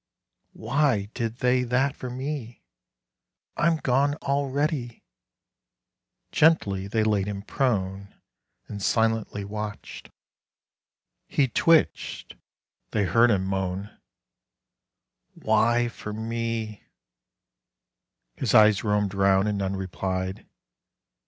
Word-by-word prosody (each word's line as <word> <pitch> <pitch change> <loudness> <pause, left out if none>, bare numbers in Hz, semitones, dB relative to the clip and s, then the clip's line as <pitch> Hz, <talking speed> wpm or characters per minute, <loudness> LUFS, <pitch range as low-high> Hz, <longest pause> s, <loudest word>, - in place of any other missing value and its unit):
"Why 115 -4 0
did 115 -2 -3
they 125 0 +3
that 130 +3 0
for 125 - -6
me? 130 -2 -5 0.9
I'm 170 0 +2
gone 140 +1 +1
already!" 140 -2 -2 1.3
Gently 100 -12 +3
they 110 +2 0
laid 105 -2 +1
him 100 -1 -5
prone 100 -6 -2 0.5
And 100 -1 -7
silently 110 -1 0
watched. 105 0 -7 1.2
He 140 - +2
twitched. 165 +6 +1 0.5
They 105 - 0
heard 115 +5 +4
him 95 -4 +1
moan 95 +1 -3 1.4
"Why 115 +2 +2
for 105 -2 -7
me?" 115 -1 -4 1.5
His - - 0
eyes 105 -2 +6
roamed 105 -2 0
round, 95 0 +3
and 105 -1 -1
none 95 0 -1
replied. 95 0 -4
110 Hz, 95 wpm, -25 LUFS, 100-125 Hz, 1.5 s, eyes